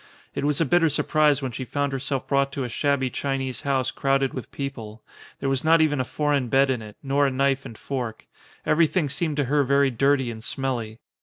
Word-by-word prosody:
It - - -3
was 145 -1 +1
a 165 - +3
bitter 165 +3 +3
surprise 150 -1 +2
when 130 - -2
she 125 +3 -5
found 140 +2 -2
herself 135 0 -2
brought 140 0 +1
to 140 - -2
a 125 - -4
shabby 135 +1 0
Chinese 135 -3 -2
house 135 -3 0
crowded 135 -1 +1
with 130 - -7
people: 115 -6 -6 0.4
there - - -2
was 135 -1 0
not 165 +1 +5
even 150 -3 +2
a - - +2
foreign 145 -1 0
bed 135 +3 +3
in 125 -3 -2
it, 105 -1 -11
nor 140 +1 +2
a - - +2
knife 135 0 +1
and 110 - -11
fork: 125 -5 -5 0.4
everything 160 -1 +2
seemed 155 0 -2
to 145 - +2
her 145 +2 +2
very 140 0 +3
dirty 135 0 +2
and 110 -1 -9
smelly. 120 -5 -3
135 Hz, 215 wpm, -24 LUFS, 130-145 Hz, 0.4 s, not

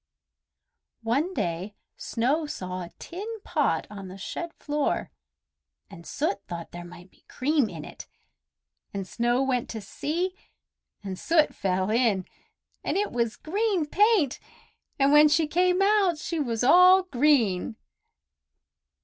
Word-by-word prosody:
One 275 +11 0
day 175 +4 -3 0.2
Snow 280 +7 -1
saw 185 -8 -5
a 175 - -9
tin 430 +6 -7
pot 290 - 0
on 195 -2 -8
the 185 +1 -9
shed 335 - -5
floor, 295 -1 -2 0.8
and 170 - -12
Soot 200 -9 -2
thought 170 -1 -7
there 175 0 -8
might 175 +1 -13
be - - -29
cream 280 -3 +1
in - - -8
it; - - -11 0.9
and 195 -1 -4
Snow 240 +4 +1
went 255 -3 -1
to 225 - -5
see, 340 - -3 0.7
and 190 -2 -5
Soot 320 -2 +3
fell 190 +1 -1
in, 220 -6 +2 0.6
and - - -1
it 410 +1 0
was 235 -2 -1
green 395 0 0
paint, 395 - +2 0.6
and 275 0 +3
when 300 +1 +8
she 310 +2 +3
came 360 +4 +2
out 395 -4 +3
she 325 +2 -3
was 235 -5 -1
all 365 +7 +7
green. 245 - +2
275 Hz, 135 wpm, -26 LUFS, -, 0.9 s, when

